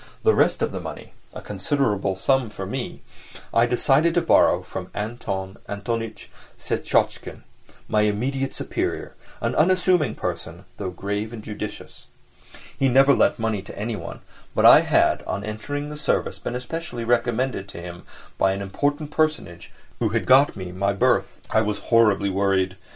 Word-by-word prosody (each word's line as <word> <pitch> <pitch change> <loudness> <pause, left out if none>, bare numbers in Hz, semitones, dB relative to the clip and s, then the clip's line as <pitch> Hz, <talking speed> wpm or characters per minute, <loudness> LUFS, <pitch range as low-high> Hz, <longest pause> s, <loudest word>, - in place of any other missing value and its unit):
The 445 - +5
rest - - +2
of - - 0
the - - -4
money—a - - -10
considerable 105 -10 -1
sum 130 +4 +1
for 105 - -6
me, - - -5 0.5
I 115 +1 +4
decided 140 +7 +2
to 175 - +4
borrow - - +4
from 95 -1 -7
Anton 100 -3 -4
Antonitch 110 +1 -4 0.3
Syetotchkin, - - -1 0.4
my 105 - +2
immediate 130 +6 -1
superior, - - -3 0.3
an - - 0
unassuming 180 -5 +3
person, - - -5
though 95 -3 -3
grave 100 +4 -4
and 115 -3 -8
judicious. 105 -1 -8 0.7
He 135 - +3
never 135 +2 +6
lent - - +3
money 110 -3 -1
to 95 - -11
anyone, 105 0 -5 0.3
but - - +3
I - - +10
had, - - +2
on 100 - -3
entering 145 +8 -4
the 150 - -7
service, 150 - -1
been 125 - -4
specially 125 -2 -5
recommended 120 -2 0
to 95 - -9
him 85 0 -8 0.4
by 95 0 +3
an 100 +1 -4
important 145 +9 -2
personage 150 - -1 0.3
who 115 - +1
had 115 +1 -1
got 135 +3 +5
me 95 -3 -6
my 100 +2 0
berth. 100 - +1
I 110 - +4
was 105 -2 -1
horribly 105 -4 +3
worried. 95 -1 +1
110 Hz, 155 wpm, -23 LUFS, 100-135 Hz, 0.7 s, I